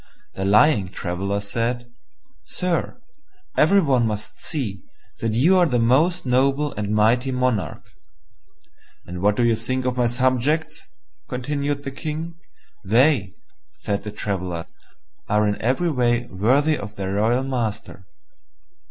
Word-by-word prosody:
The 95 - -3
lying 105 - +4
Traveller 100 +2 -3
said, 120 +4 -3 0.5
"Sire, 180 +5 -2 0.6
every 195 +6 +5
one 130 -7 +2
must 105 -1 -5
see 115 - -4 0.4
that 115 -1 -1
you 165 +11 +4
are 175 - +4
a 125 -5 +1
most 140 +10 +2
noble 135 +3 +2
and 105 -1 -4
mighty 115 +5 +2
monarch." 125 -4 -1 1.2
"And 90 0 -7
what 105 +1 +3
do 120 - +1
you 115 -1 +3
think 130 +3 -2
of 125 0 -1
my 120 -1 +3
subjects?" 130 +6 0 0.4
continued 140 +2 -2
the 135 - -4
King. 155 +4 -5 0.5
"They," 115 -1 +3 0.4
said 100 -1 -3
the 105 - -6
Traveller, 90 -5 -4 0.6
"are 105 0 +3
in 105 - -2
every 135 +9 +1
way 120 -3 +1
worthy 135 +11 +2
of 105 +1 -8
their 95 0 -3
royal 115 +5 +2
master." 110 -7 -4
120 Hz, 135 wpm, -22 LUFS, 105-140 Hz, 1.2 s, every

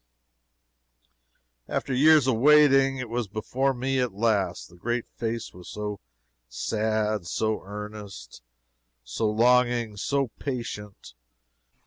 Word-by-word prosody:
After 135 - -2
years 150 +2 +6
of 130 -4 +2
waiting, 135 0 +5
it 130 -1 -4
was 120 -1 -2
before 125 +6 -1
me 130 +1 -1
at 125 -5 0
last. 105 -3 0
The 90 - -18
great 120 +6 -3
face 115 0 -4
was 90 0 -12
so 105 -2 -5 0.5
sad, 105 - -1
so 110 +4 -1
earnest, 105 - -9 0.6
so 65 - -1
longing, 120 -1 +2
so 140 +4 0
patient. 105 - -6
115 Hz, 110 wpm, -26 LUFS, 105-130 Hz, 0.6 s, years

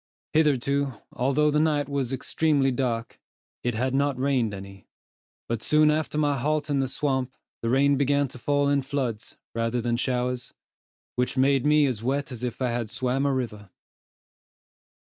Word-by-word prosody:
Hitherto, 140 -2 +2 0.2
although 140 +4 +2
the 150 - +2
night 150 -3 +2
was 140 -3 -1
so 135 - -1
extremely 140 0 +1
dark, 120 -3 -2 0.4
it 120 -2 -1
had 130 +3 0
not 140 -1 +1
rained 130 -4 +1
any, 100 0 -10 0.6
but 115 -1 -2
soon 150 +3 +4
after 155 0 -1
my 145 -2 +1
halt 150 +2 0
in 140 - +2
the 135 - +1
swamp 130 -1 -1 0.3
the 115 - -1
rain 140 +2 +4
began 140 +1 +2
to 125 - -11
fall 145 +3 +1
in 140 0 +2
floods, 130 -5 -3 0.2
rather 115 +1 0
than 120 0 -1
in 120 - +1
showers, 125 0 -2 0.6
which 125 +1 0
made 135 +1 +3
me 150 0 +5
as 125 -6 -1
wet 135 +3 -1
as 120 -2 -7
if 125 +1 -3
I 125 - +1
had 120 -2 -2
swam 130 +4 0
a - - +2
river. 110 -6 -3
135 Hz, 175 wpm, -26 LUFS, 120-145 Hz, 0.6 s, me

